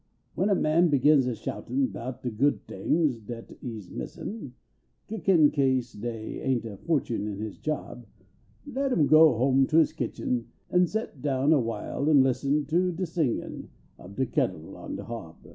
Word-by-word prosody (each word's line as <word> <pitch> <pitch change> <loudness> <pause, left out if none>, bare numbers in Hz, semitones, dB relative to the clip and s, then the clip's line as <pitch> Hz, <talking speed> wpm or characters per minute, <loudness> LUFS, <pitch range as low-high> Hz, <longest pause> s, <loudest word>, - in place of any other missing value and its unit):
Wen 190 +5 +1
a 200 - +4
man 165 +2 +3
begins 140 -1 +4
a 125 - -1
shoutin* 115 +6 -2
bout 125 0 -6
de 125 - -2
<food 135 +7 +1
tings 150 -8 0
dat 115 +2 -9
he 115 -3 -5
s 100 -4 -10
missin 170 - -7 0.5
Kickin 180 -7 +3
kase 130 -4 +1
dey 110 0 -5
ain 130 -2 +1
t 115 - -8
a 100 - -8
fortune 125 - -1
in 105 -2 -4
his 105 -1 -6
job, 140 -6 -4 0.6
Let 275 -1 -2
im 155 - +3
go 155 -4 +6
home 135 +2 +3
to 155 - +2
his 160 - +4
kitchen, 120 -1 -2 0.2
an 180 0 +4
st 220 +4 -3
t 140 - -20
down 140 +1 +2
a 150 - +4
while 115 +5 -2
an 145 -4 +6
listen 135 +3 +1
To 175 +5 +1
de 180 +2 -3
singin 160 -7 -2 0.3
ob 95 +3 -12
de 130 - +1
kettle - - -2
on - - -7
de - - -6
hob. 115 -9 -7
135 Hz, 185 wpm, -27 LUFS, 120-155 Hz, 0.6 s, go